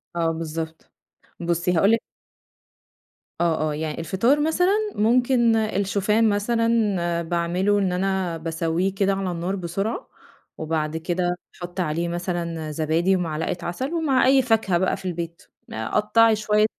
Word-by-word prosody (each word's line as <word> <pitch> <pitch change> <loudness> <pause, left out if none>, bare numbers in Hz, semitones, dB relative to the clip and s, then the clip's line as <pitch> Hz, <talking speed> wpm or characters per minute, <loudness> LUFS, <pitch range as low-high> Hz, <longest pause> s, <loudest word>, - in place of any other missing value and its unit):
آه 165 -1 +1
بالضبط، 160 0 -6 0.5
بُصّي 170 +1 0
هاقول 195 +5 +4
لِك 230 - +3 1.4
آه 160 -2 +1
آه، - - -3
يع 155 +1 -3
الفطار 195 - +1
مثلًا 360 +6 +2 0.2
ممكن 235 +1 +3
الشوفان 210 +1 +1
مثلًا 205 -5 +1
باعمله 175 +4 0
إن 190 -2 +1
أنا 185 -2 -1
باسوّيه 165 +3 -1
كده 195 0 +2
على 195 -2 -2
النار 175 +3 -2
بسرعة، 195 +5 -3 0.5
وبعد 155 0 -2
كده 175 +2 -1 0.2
باحط 175 +1 -8
عليه 170 0 -1
مثلًا 170 -2 -3
زبادي 160 +5 +1
ومعلقة 165 -1 -2
عسل 260 - -3
ومع 290 -6 +2
أي 265 +1 +5
فاكهة 225 -7 +2
بقى 185 - 0
في 190 - -12
البيت، 170 -1 -4 0.3
قطعي 210 - +3
شوية 210 0 +2
185 Hz, 130 wpm, -23 LUFS, 170-215 Hz, 1.4 s, أي